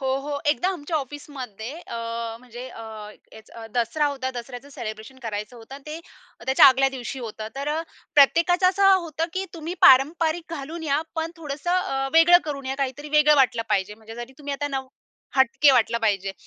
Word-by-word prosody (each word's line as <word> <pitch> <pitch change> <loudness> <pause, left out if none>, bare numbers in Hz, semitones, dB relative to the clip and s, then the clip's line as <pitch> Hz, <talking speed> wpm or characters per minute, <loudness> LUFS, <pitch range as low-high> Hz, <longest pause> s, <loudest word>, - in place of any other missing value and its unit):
हो, 265 - -3
हो. 285 +1 -4
एकदा 355 +5 0
आमच्या 320 -1 -3
ऑफिसमध्ये 265 -5 -7
अ, 230 0 -4
म्हणजे 245 +1 -10
अ, 225 - -10 0.5
हेच 220 0 -15
अ, 230 -1 -10
दसरा 245 +6 +1
होता. 265 -2 -3
दसऱ्याचं 245 +2 -8
सेलिब्रेशन 220 +1 -8
करायचं 215 +1 -5
होतं. 230 +3 -11
अन् 280 - -11
ते 305 +1 -6 0.5
त्याच्या 265 0 +7
आदल्या 270 0 +5
दिवशी 255 +2 -6
होतं. 220 -3 -6
तर 280 +1 -3
अ, 310 +2 0 0.3
प्रत्येकाचं 340 +6 +5
असं 390 +1 +4
होतं, 330 -3 -2
की 380 +1 -2
तुम्ही 330 +1 -5
पारंपरिक 320 +5 +4
घालून 320 +3 -7
या 290 -1 +1
पण 325 0 -2
थोडंसं 300 +1 -5
अ, 270 -8 0
वेगळं 330 +2 +7
करून 275 -3 -5
या. 265 - -2
काहीतरी 275 +2 -3
वेगळं 300 0 +5
वाटलं 250 -4 +3
पाहिजे. 195 +2 0
म्हणजे 225 +1 -12
जरी 240 +2 -8
तुम्ही 290 -1 -5
आता 290 +1 -3
नऊ 265 -2 -4 0.5
हटके 270 +2 +5
वाटलं 235 -2 +2
पाहिजे. 200 -4 0
275 Hz, 180 wpm, -24 LUFS, 235-305 Hz, 0.5 s, त्याच्या